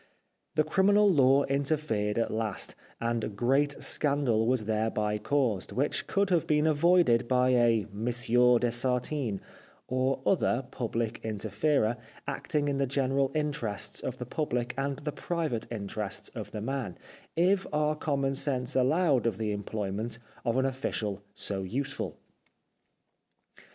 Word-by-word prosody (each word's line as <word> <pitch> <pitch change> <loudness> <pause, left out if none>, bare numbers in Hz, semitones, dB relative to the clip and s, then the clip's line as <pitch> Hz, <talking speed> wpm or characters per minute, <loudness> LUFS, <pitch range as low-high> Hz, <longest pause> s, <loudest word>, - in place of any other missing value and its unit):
The 155 - +4
criminal 200 +6 +4
law 140 -6 +5
interfered 140 -7 0
at 115 - 0
last, 110 -3 -2 0.3
and 115 -3 -2
great 135 +5 +1
scandal 140 -7 +2
was 125 -3 +1
thereby 105 -1 0
caused, 115 -4 0
which 140 +3 0
could 200 -1 +1
have 170 -3 +2
been 150 0 +3
avoided 155 -6 +4
by 125 0 +3
a 120 -4 +3
Monsieur 120 +2 +3
de 120 0 0
Sartine, 125 -2 0 0.5
or 130 +1 0
other 135 -8 +2
Public 115 -1 -2
Inter 110 -1 -4
ferer, 120 0 +2 0.3
acting 145 -1 -1
in 140 -1 0
the 135 - +1
general 135 0 +1
interests 145 -9 -2
of 130 - -4
the 125 - -5
public 125 -3 -2
and 135 0 -2
the 150 +1 -4
private 155 -9 -3
interests 105 -2 -4
of - - -7
the 105 - -6
man, 115 -7 -3 0.4
if 185 +3 +2
our 150 0 +1
commonsense 135 -3 -1
allowed 135 0 +3
of 110 - -1
the 110 -1 -1
employment 105 +2 -3 0.3
of 115 +1 0
an 130 - +2
official 110 -6 -2
so 100 -1 -2
useful. 135 +9 -3
125 Hz, 135 wpm, -29 LUFS, 110-145 Hz, 0.5 s, law